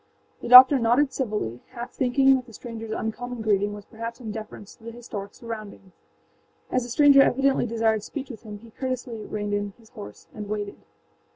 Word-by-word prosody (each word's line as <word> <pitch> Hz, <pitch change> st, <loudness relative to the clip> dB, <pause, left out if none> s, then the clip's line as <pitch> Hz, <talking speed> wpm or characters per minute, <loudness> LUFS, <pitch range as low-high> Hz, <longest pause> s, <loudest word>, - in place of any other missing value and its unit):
The -, -, -6 dB
doctor 260 Hz, +3 st, +10 dB
nodded 250 Hz, +4 st, +2 dB
civilly, 210 Hz, -, -3 dB
half 240 Hz, +1 st, -7 dB
thinking 270 Hz, +1 st, +3 dB
that 255 Hz, -1 st, -4 dB
the 230 Hz, -, -14 dB
strangerâs 225 Hz, 0 st, -6 dB
uncommon 240 Hz, +1 st, -5 dB
greeting 205 Hz, -1 st, +1 dB
was 205 Hz, -1 st, -10 dB
perhaps 230 Hz, +2 st, -7 dB
in 225 Hz, -4 st, -6 dB
deference 210 Hz, -1 st, -9 dB
to -, -, -24 dB
the 230 Hz, -, -7 dB
historic 220 Hz, -4 st, -8 dB
surroundings. 215 Hz, -5 st, -9 dB, 0.8 s
As 255 Hz, -, +1 dB
the 240 Hz, -, -7 dB
stranger 280 Hz, +2 st, +6 dB
evidently 270 Hz, -1 st, +2 dB
desired 225 Hz, -1 st, 0 dB
speech 275 Hz, +5 st, -7 dB
with 225 Hz, -, -11 dB
him 210 Hz, -3 st, -9 dB
he 225 Hz, +2 st, -16 dB
courteously 250 Hz, -3 st, -5 dB
reined 205 Hz, -1 st, -4 dB
in 205 Hz, -1 st, -2 dB
his 225 Hz, -2 st, -21 dB
horse 105 Hz, 0 st, -11 dB
and 210 Hz, -1 st, -8 dB
waited. 205 Hz, -1 st, -4 dB
230 Hz, 185 wpm, -25 LUFS, 210-250 Hz, 0.8 s, doctor